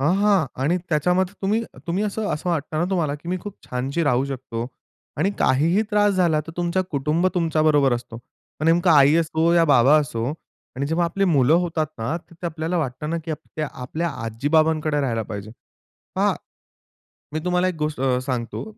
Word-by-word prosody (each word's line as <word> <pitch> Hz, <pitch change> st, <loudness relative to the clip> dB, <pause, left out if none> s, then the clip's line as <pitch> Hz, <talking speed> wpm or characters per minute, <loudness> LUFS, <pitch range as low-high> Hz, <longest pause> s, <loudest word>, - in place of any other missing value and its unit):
हां, 150 Hz, +6 st, +3 dB
हां 200 Hz, -5 st, +3 dB, 0.2 s
आणि 160 Hz, +6 st, +2 dB
त्याच्यामध्ये 180 Hz, +5 st, +1 dB
तुम्ही 210 Hz, +4 st, +1 dB, 0.2 s
तुम्ही 180 Hz, +5 st, 0 dB
असं 210 Hz, 0 st, -2 dB
असं 150 Hz, +4 st, -5 dB
वाटतं 155 Hz, -1 st, -2 dB
ना 170 Hz, -, +2 dB
तुम्हाला 165 Hz, -7 st, 0 dB
की 150 Hz, +3 st, -10 dB
मी 180 Hz, -, 0 dB
खूप 205 Hz, -2 st, -7 dB
छानशी 135 Hz, +6 st, -2 dB
राहू 130 Hz, -2 st, +2 dB
शकतो 125 Hz, -4 st, -5 dB, 0.5 s
आणि 180 Hz, +6 st, +2 dB
काहीही 165 Hz, +10 st, +3 dB
त्रास 205 Hz, -1 st, +3 dB
झाला 170 Hz, -4 st, +2 dB
तर 165 Hz, -, -8 dB
तुमचा 175 Hz, +1 st, 0 dB
कुटुंब 150 Hz, +5 st, +1 dB
तुमच्याबरोबर 155 Hz, -5 st, +3 dB
असतो. 120 Hz, -1 st, -7 dB
मग 125 Hz, +5 st, -12 dB
नेमकं 175 Hz, +2 st, +4 dB
आई 145 Hz, -1 st, +6 dB
असो 165 Hz, 0 st, +2 dB
या 170 Hz, -1 st, +5 dB
बाबा 135 Hz, +3 st, +6 dB
असो 115 Hz, -5 st, -3 dB, 0.5 s
आणि 140 Hz, +2 st, -1 dB
जेव्हा 165 Hz, +3 st, +1 dB
आपली 190 Hz, +4 st, 0 dB
मुलं 135 Hz, +2 st, +4 dB
होतात 165 Hz, -2 st, -1 dB
ना, 115 Hz, +9 st, -2 dB
तर 170 Hz, -, -20 dB
ते -, -, -1 dB
आपल्याला 165 Hz, +2 st, -2 dB
वाटतं 150 Hz, 0 st, -3 dB
ना 170 Hz, -, 0 dB
की 165 Hz, -, -5 dB
आपक्या 155 Hz, 0 st, -5 dB
ते 135 Hz, -, -11 dB
आपल्या 160 Hz, +7 st, -2 dB, 0.2 s
आजी-बाबांकडे 150 Hz, +5 st, +1 dB
राहायला 115 Hz, -5 st, -1 dB
पाहिजे. 105 Hz, 0 st, -7 dB, 0.7 s
पहा 200 Hz, +2 st, +2 dB, 1.0 s
मी 155 Hz, -, -1 dB
तुम्हाला 180 Hz, 0 st, +2 dB
एक 185 Hz, -, -2 dB
गोष्ट 150 Hz, -3 st, -2 dB
अ, 130 Hz, -2 st, +2 dB
सांगतो, 125 Hz, -3 st, -3 dB
155 Hz, 185 wpm, -23 LUFS, 135-175 Hz, 1.0 s, आई